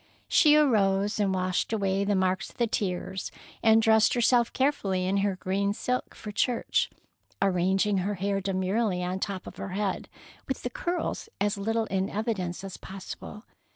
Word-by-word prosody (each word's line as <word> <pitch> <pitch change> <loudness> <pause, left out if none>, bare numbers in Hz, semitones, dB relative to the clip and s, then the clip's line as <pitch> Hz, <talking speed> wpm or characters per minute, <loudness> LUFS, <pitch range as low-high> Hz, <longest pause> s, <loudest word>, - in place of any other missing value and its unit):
She 300 -1 +6
arose 210 -8 +3
and 200 -2 +2
washed 185 +1 0
away 200 -2 +1
the 205 0 +1
marks 185 0 0
of - - -20
the 235 - +2
tears, 190 -3 -2 0.3
and 225 0 +5
dressed 220 +1 +5
herself 240 0 +3
carefully 195 -10 0
in 190 +2 +1
her 200 -1 +1
green 200 +2 -1
silk 250 +2 -2
for 210 - -7
church, 235 +3 +1 0.5
arranging 195 +1 +2
her 200 +3 -1
hair 195 +1 -1
demurely 190 0 0
on 180 +1 -2
the - - -7
top 190 -2 -3
of - - -10
her 190 - -5
head, 205 -2 -2 0.4
with - - -3
the - - -3
curls 390 -2 -3
as 205 0 +1
little 225 +3 0
in 190 -1 -1
evidence 200 -5 -2
as 195 -2 -7
possible. 195 +2 -9
200 Hz, 170 wpm, -28 LUFS, 190-220 Hz, 0.5 s, She